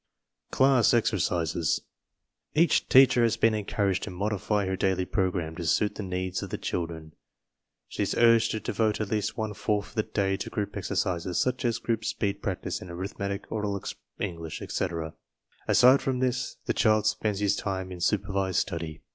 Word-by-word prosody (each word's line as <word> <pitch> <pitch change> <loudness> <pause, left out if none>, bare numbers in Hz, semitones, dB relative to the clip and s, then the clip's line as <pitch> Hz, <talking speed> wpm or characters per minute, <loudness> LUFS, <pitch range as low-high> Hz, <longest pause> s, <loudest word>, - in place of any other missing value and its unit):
CLASS 130 -3 +4
EXERCISES 85 -7 +1 0.7
Each 165 +3 +3
teacher 130 -2 +7
has 115 -1 +2
been 115 -1 +3
encouraged 100 -2 0
to - - -5
modify 100 +2 -1
her 95 0 -1
daily 95 -1 0
program 90 -5 -1
to 85 - -4
suit 105 +5 +2
the - - -6
needs 95 -1 -3
of - - -6
the - - -3
children. 80 -2 -4 0.8
She - - -5
is - - 0
urged 115 -1 +5
to 110 - -2
devote 110 -1 0
at 105 -2 -3
least 105 -1 -1
one 110 -2 -2
fourth 105 0 -1
of - - -18
the 110 - +1
day 100 -3 -1
to - - -5
group 100 -2 -3
exercises 90 -3 -1
such 130 0 0
as 120 -1 +1
group 115 -2 -2
speed 100 -2 -2
practice - - -3
in 90 - -9
arithmetic, 100 +3 -4
oral 105 -2 -2 0.4
English, 85 -4 -4
etc. 85 -4 -3 0.5
Aside 130 +3 +6
from 130 -1 -1
this, 125 -1 -1
the - - 0
child 110 -1 +3
spends 110 -1 0
his 100 -1 +2
time 95 -2 -3
in 90 -1 -8
supervised 95 -1 0
study. 85 -4 -3
100 Hz, 170 wpm, -27 LUFS, 90-110 Hz, 0.8 s, teacher